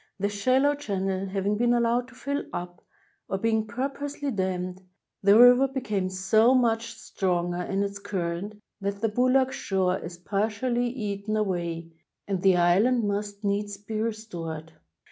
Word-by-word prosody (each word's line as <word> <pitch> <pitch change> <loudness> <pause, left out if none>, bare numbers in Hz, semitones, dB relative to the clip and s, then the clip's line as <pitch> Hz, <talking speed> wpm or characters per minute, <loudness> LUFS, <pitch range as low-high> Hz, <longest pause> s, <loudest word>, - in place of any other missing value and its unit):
The 200 +1 0
shallow 255 +8 +2
channel 195 -8 -2
having 200 +2 -1
been 240 0 +3
allowed 240 +1 +1
to 260 - -16
fill 280 +2 -3
up, 175 0 -6 0.5
or 195 - 0
being 220 +1 0
purposely 275 +4 -3
dammed, 185 -2 -2 0.4
the 200 +2 +6
river 245 +3 +8
became 215 -8 -2
so 215 +7 +3
much 230 -2 +1
stronger 175 -2 -1
in 195 +2 -1
its 200 0 -4
current 200 +1 -4 0.2
that 200 0 -3
the 225 - +2
Boulak 255 +4 +3
shore 190 -4 0
is 170 +1 -8
partially 220 +6 -1
eaten 215 -3 -3
away, 170 -5 -2 0.4
and 195 -3 -1
the 190 -2 +5
island 205 +7 +3
must 205 0 -3
needs 205 0 -1
be 215 +2 -4
restored. 170 -8 -5
205 Hz, 145 wpm, -26 LUFS, 190-235 Hz, 0.5 s, river